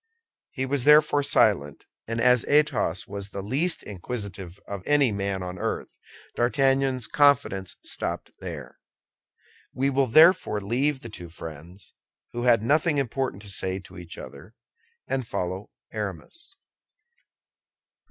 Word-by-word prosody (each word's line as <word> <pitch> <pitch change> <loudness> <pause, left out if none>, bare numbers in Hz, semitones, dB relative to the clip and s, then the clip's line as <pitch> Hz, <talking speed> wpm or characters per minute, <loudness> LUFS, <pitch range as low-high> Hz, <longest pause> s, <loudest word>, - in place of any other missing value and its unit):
He 130 - -3
was 135 -1 -1
therefore 150 -1 +6
silent; 105 - +3 0.2
and 115 +1 -3
as 125 0 +4
Athos 145 - +2
was 100 0 -7
the 100 -1 -6
least 145 - -1
inquisitive 100 -3 -7
of 100 -2 -5
any 145 -4 +4
man 100 -2 -2
on 90 0 -6
earth, - - -3 0.4
D'Artagnan's 135 0 +1
confidence 140 -11 +2
stopped - - -5
there. - - -8 1.0
We 135 +2 +1
will 135 0 +2
therefore 155 - +5
leave 130 +7 0
the 115 - -8
two 90 -5 -9
friends, 80 +3 -10 0.4
who 120 +1 -3
had 115 -3 +4
nothing 150 +4 +2
important 130 -5 -2
to 100 - -9
say 95 -1 -2
to 90 0 -13
each 85 -1 -10
other, 115 - -11 0.5
and 130 -3 -2
follow 95 +1 -4 0.2
Aramis. 105 - -6
115 Hz, 130 wpm, -26 LUFS, 95-135 Hz, 1.0 s, therefore